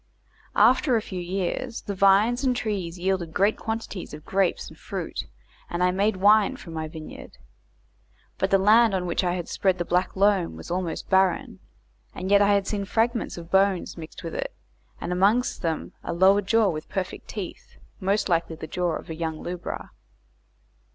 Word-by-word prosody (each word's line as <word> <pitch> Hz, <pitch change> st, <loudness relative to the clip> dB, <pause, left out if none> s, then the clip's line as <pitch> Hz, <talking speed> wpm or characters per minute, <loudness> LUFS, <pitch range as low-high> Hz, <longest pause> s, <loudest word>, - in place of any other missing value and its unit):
After 250 Hz, +4 st, +4 dB
a 225 Hz, -, +2 dB
few 185 Hz, -, -6 dB
years 190 Hz, +7 st, -3 dB
the 200 Hz, -, -4 dB
vines 200 Hz, +6 st, +4 dB
and 255 Hz, -2 st, +2 dB
trees 195 Hz, -7 st, -3 dB
yielded 180 Hz, -2 st, -1 dB
great 200 Hz, +3 st, +3 dB
quantities 220 Hz, -7 st, -5 dB
of 150 Hz, -, -13 dB
grapes 190 Hz, -2 st, 0 dB
and -, -, -12 dB
fruit, -, -, -5 dB, 0.4 s
and 175 Hz, +1 st, -1 dB
I 180 Hz, -, +4 dB
made 200 Hz, +3 st, +1 dB
wine 205 Hz, +2 st, +4 dB
from 165 Hz, -, -10 dB
my 160 Hz, -1 st, -3 dB
vineyard. 155 Hz, 0 st, -10 dB, 1.0 s
But 190 Hz, -, +1 dB
the 195 Hz, -, +5 dB
land 215 Hz, +2 st, +5 dB
on 180 Hz, -1 st, -1 dB
which 175 Hz, +2 st, 0 dB
I 175 Hz, 0 st, +1 dB
had 175 Hz, -2 st, -4 dB
spread 190 Hz, -2 st, +1 dB
the 175 Hz, -, -2 dB
black 180 Hz, +2 st, 0 dB
loam 195 Hz, -3 st, +2 dB
was -, -, -9 dB
almost 175 Hz, -2 st, -3 dB
barren, 190 Hz, +4 st, +2 dB, 0.6 s
and 185 Hz, +1 st, -4 dB
yet 200 Hz, 0 st, +6 dB
I 205 Hz, 0 st, +4 dB
had 200 Hz, -1 st, +1 dB
seen 200 Hz, 0 st, -2 dB
fragments 230 Hz, +2 st, 0 dB
of 170 Hz, 0 st, -9 dB
bones 190 Hz, -1 st, +2 dB
mixed 160 Hz, -2 st, -10 dB
with -, -, -5 dB
it, -, -, -4 dB, 0.4 s
and -, -, -4 dB
amongst 205 Hz, +7 st, +2 dB
them 165 Hz, -3 st, -2 dB
a -, -, -3 dB
lower 190 Hz, +4 st, +5 dB
jaw 220 Hz, +2 st, +3 dB
with 155 Hz, 0 st, -6 dB
perfect 190 Hz, -2 st, -4 dB
teeth, 200 Hz, -5 st, -8 dB, 0.2 s
most 200 Hz, +2 st, +1 dB
likely 170 Hz, -2 st, 0 dB
the 160 Hz, -, -7 dB
jaw 175 Hz, +1 st, -1 dB
of -, -, -7 dB
a 160 Hz, -, -5 dB
young 160 Hz, -1 st, -3 dB
lubra. 175 Hz, 0 st, -5 dB
190 Hz, 185 wpm, -25 LUFS, 175-210 Hz, 1.0 s, yet